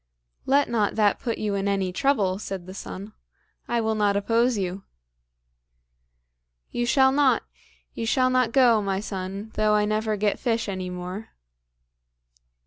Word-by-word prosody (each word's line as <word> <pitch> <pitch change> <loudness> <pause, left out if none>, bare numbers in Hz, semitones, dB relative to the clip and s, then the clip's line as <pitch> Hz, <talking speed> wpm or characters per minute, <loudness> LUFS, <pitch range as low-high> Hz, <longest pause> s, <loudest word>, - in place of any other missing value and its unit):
"Let 280 +2 +4
not 220 -4 0
that 210 -2 +2
put 230 -2 -3
you 210 -1 -2
in 200 0 -1
any 195 -2 0
trouble," 200 -7 +1
said 195 -4 -6
the 185 - -9
son; 200 +2 -8 0.5
"I 240 - 0
will 220 0 0
not 205 -2 +2
oppose 230 +3 +2
you." 190 0 -3 1.9
"You 240 0 -1
shall 265 +1 +4
not; 275 -1 +3 0.5
you 225 - -4
shall 255 +3 +2
not 255 -3 +2
go, 235 -4 +5
my 195 -1 -1
son, 195 +1 -5
though 215 0 +2
I 210 0 +3
never 215 0 -1
get 205 0 0
fish 230 -3 -1
any 185 -2 -4
more." 180 +4 -6
215 Hz, 150 wpm, -25 LUFS, 195-235 Hz, 1.9 s, go